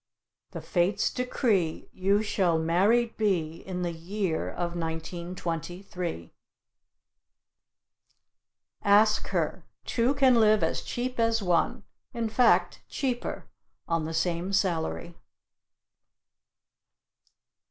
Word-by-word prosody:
The - - -7
fates 185 +3 +1
decree 220 - 0
You 200 +3 +2
shall 185 -6 +1
married 200 +9 +2
be 170 -7 0
In 180 0 -5
the 175 - -1
year 170 +1 -2
of 175 0 -3
1923. 170 - -5 2.5
Ask 210 +1 +4
her - - -2 0.2
two 245 +4 +1
can 260 -4 +5
live 215 -1 +4
as - - 0
cheap 250 0 -4
as 230 -1 +2
one, 175 -2 +1 0.3
in 230 -1 -1
fact 240 +2 +3
cheaper, 255 -4 -3 0.4
on 165 -2 0
the 160 - -4
same 175 +3 -1
salary. 175 -3 -1
185 Hz, 95 wpm, -28 LUFS, 170-220 Hz, 2.5 s, can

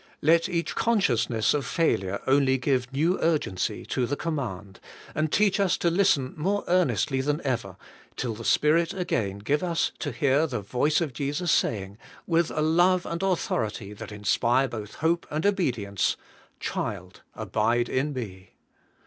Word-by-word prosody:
Let 165 +2 +4
each 170 -1 -1
consciousness 125 - +1
of 145 -2 0
failure 100 - 0
only 135 0 +3
give 125 -1 0
new 160 +7 +1
urgency 145 - 0
to 125 -2 -1
the 145 - -1
command, 110 - -4 0.3
and 155 0 -1
teach 205 -1 +3
us 195 -3 +2
to 170 - +1
listen 165 -8 +2
more 195 +6 -1
earnestly 170 -6 +2
than 150 +3 0
ever 115 -9 -2 0.4
till 120 -3 -2
the 110 +2 -8
Spirit 165 +7 +2
again 110 - -1
give 140 +9 0
us 170 -2 0
to 145 - -3
hear 140 +5 +2
the 125 -7 -3
voice 135 - +1
of 155 -6 -2
Jesus 145 +6 -1
saying, 100 -1 0 0.3
with 170 -1 +2
a 155 - -2
love 175 +3 +3
and 170 +1 -4
authority 110 - -1
that 105 - -9
inspire 120 +6 +1
both 110 -4 -7
hope 170 +1 +1
and 155 +4 -2
obedience, 125 - 0 0.2
* - - -30
Child, - - -4
abide 115 +2 0
in 135 +5 -1
me.' 100 -8 -7
140 Hz, 155 wpm, -26 LUFS, 115-170 Hz, 0.4 s, Let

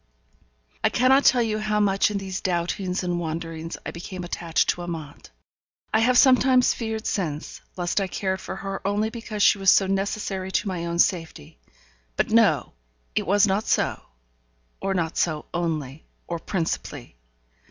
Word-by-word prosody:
I - - +4
cannot 265 +3 +4
tell 245 -2 +5
you 215 -1 -1
how 215 0 0
much 195 -1 +3
in 210 - -2
these 195 -1 -5
doubtings 180 +1 -1
and 175 -1 -1
wanderings 165 0 -5
I - - -4
became 180 +2 -7
attached 170 -1 0
to 175 - -7
Amante. 160 -4 -7 0.6
I 220 - +4
have 245 +2 +3
sometimes 255 -1 +5
feared 220 -1 -4
since, 155 -7 -3 0.2
lest 175 +3 0
I 195 - -1
cared 190 +1 -2
for - - -6
her 195 0 -5
only 205 +2 0
because 220 -3 -3
she 205 - +5
was 195 -1 +4
so 195 - +6
necessary 195 -1 -2
to - - 0
my 175 -3 -3
own 170 0 -2
safety; 165 - -1 0.6
but, - - 0
no! - - +3 0.4
it - - -1
was 205 +2 +5
not 200 +2 0
so; - - +1 0.8
or 195 0 -1
not 165 -3 -1
so 155 -3 0
only, 155 -4 -3 0.2
or 170 -1 -4
principally. 165 - -4
190 Hz, 165 wpm, -24 LUFS, 170-210 Hz, 0.8 s, so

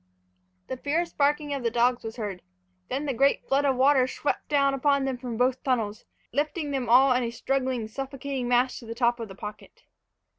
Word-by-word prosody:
The 260 - -5
fierce 325 +6 -1
barking 290 0 +1
of 275 - -3
the 235 - +1
dogs 240 +1 +2
was 225 0 -6
heard. 205 -6 -5 0.5
Then 270 +4 -2
the 275 - -1
great 275 +4 +2
flood 275 +1 +2
of 270 -2 +3
water 260 0 +4
swept 285 - -3
down 280 -2 +3
upon 280 0 +2
them 265 -1 -1
from 245 -3 -5
both 255 +1 +1
tunnels, 225 -5 -1 0.3
lifting 295 +3 -1
them 260 -4 -2
all 255 +2 +6
in 250 - +1
a 235 - -1
struggling, 255 -1 -1
suffocating 270 +1 -4
mass 245 +1 +2
to 235 - -12
the 230 - -5
top 240 0 +2
of 230 - -5
the 190 - -11
pocket. 210 +1 -10
260 Hz, 200 wpm, -26 LUFS, 240-280 Hz, 0.5 s, all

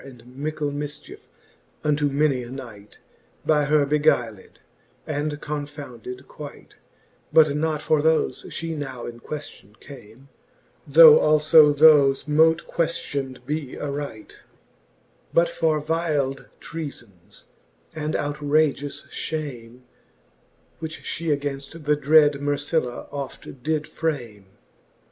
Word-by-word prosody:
And 125 -4 -14
mickle 150 +1 -3
miichiefe 145 +1 -7 0.6
unto 150 -1 +1
many 140 -2 +1
a 120 - -9
knight, 115 -6 -10 0.5
By 150 -2 +3
her 150 0 +3
beguyled, 140 -8 0 0.5
and 150 0 -3
confounded 145 -4 -7
quight: 150 -2 -11 0.6
But 155 -2 +5
not 155 0 -1
for 155 -2 +2
thole 160 +1 +2
Ihe 165 0 -5
now 135 -5 -6
in 120 0 -8
quefton 120 -7 -9
came, 130 0 -14 0.6
Though 475 -2 +9
al(b 150 -1 +5
thofe 145 -3 +6
mote 160 +2 +3
queftion'd 140 -6 -3
be 150 -1 -4
aright, 140 -6 -6 1.0
But 170 0 +4
for 160 -2 0
vyld 150 -4 -1
treafbns, 120 - -9 0.5
and 155 0 -3
outrageous 145 -1 0
fhame, 125 -6 -6 1.0
Which 160 -1 -7
fhe 165 - -5
againft 140 +3 -6
the 150 0 +2
dred 150 -1 +4
Mercilla 145 -2 -1
oft 140 -2 -8
did 155 +2 -1
frame. 120 -11 -4
145 Hz, 110 wpm, -23 LUFS, 135-155 Hz, 1.0 s, Though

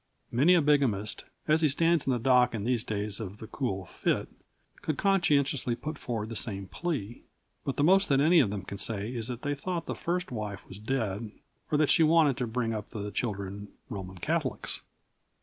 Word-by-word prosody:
Many 145 +10 +5
a 170 - +4
bigamist, 130 -9 +2 0.2
as 155 +1 +4
he 155 - +4
stands 165 +2 +2
in - - +3
the 125 - +2
dock 125 0 +4
in 105 - -3
these 120 -1 +1
days 105 -1 -3
of 100 -2 -6
the 110 - -8
cool 100 -6 -3
fit, - - -1 0.5
could 155 - -2
conscientiously 145 -10 +2
put 155 +6 -5
forward 115 -6 -4
the 115 - -5
same 100 -3 -1
plea. 120 - -4 0.4
But 135 - -2
the 145 - +2
most 190 +4 +5
that 135 -1 +4
any 165 +4 +6
of 120 - +4
them 100 -1 -4
can 100 +1 -7
say 105 +2 -1
is 115 -2 -3
that 125 0 -6
they 145 -1 0
thought 170 +3 -3
the - - -3
first 180 -1 -2
wife 105 -5 -5
was 95 - -9
dead 110 -3 -2 0.4
or 150 - +3
that 150 -1 +4
she - - +5
wanted 155 -3 +5
to 125 - -1
bring 115 0 -1
up 105 -2 -5
the 105 -1 -5
children 100 -3 -3 0.2
Roman 95 -4 -6
Catholics. - - -2
120 Hz, 200 wpm, -29 LUFS, 105-150 Hz, 0.5 s, any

